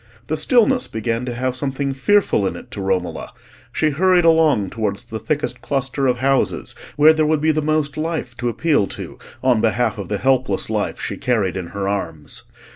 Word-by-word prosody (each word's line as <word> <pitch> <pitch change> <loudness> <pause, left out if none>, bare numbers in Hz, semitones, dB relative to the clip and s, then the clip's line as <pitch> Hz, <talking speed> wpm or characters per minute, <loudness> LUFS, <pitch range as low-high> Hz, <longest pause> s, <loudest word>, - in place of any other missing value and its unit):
The 155 - -1
stillness 245 - +3
began 115 +2 -2
to 125 - -3
have 130 +1 -1
something 135 +1 -2
fearful 135 - +2
in - - -3
it - - -11
to 100 - -5
Romola; 95 -2 -2 0.4
she 155 -1 +1
hurried 180 +3 +3
along 155 - +4
towards 105 -1 -2
the 115 -2 -6
thickest 145 +7 -2
cluster 135 0 -1
of 125 -1 +2
houses, 135 +2 0 0.2
where 155 +2 +7
there 155 -1 +1
would 155 -1 +2
be 155 +1 +3
the 155 0 0
most 150 -1 0
life 155 -6 -3
to 120 -1 -1
appeal 145 -4 +1
to - - -7 0.2
on 125 -4 +3
behalf 115 -1 +1
of 100 - -5
the 105 - -1
helpless 130 -5 +1
life - - -2
she - - -4
carried 110 -7 0
in 90 -2 -4
her 100 +2 -4
arms. 80 -7 -4
130 Hz, 195 wpm, -20 LUFS, 110-155 Hz, 0.4 s, where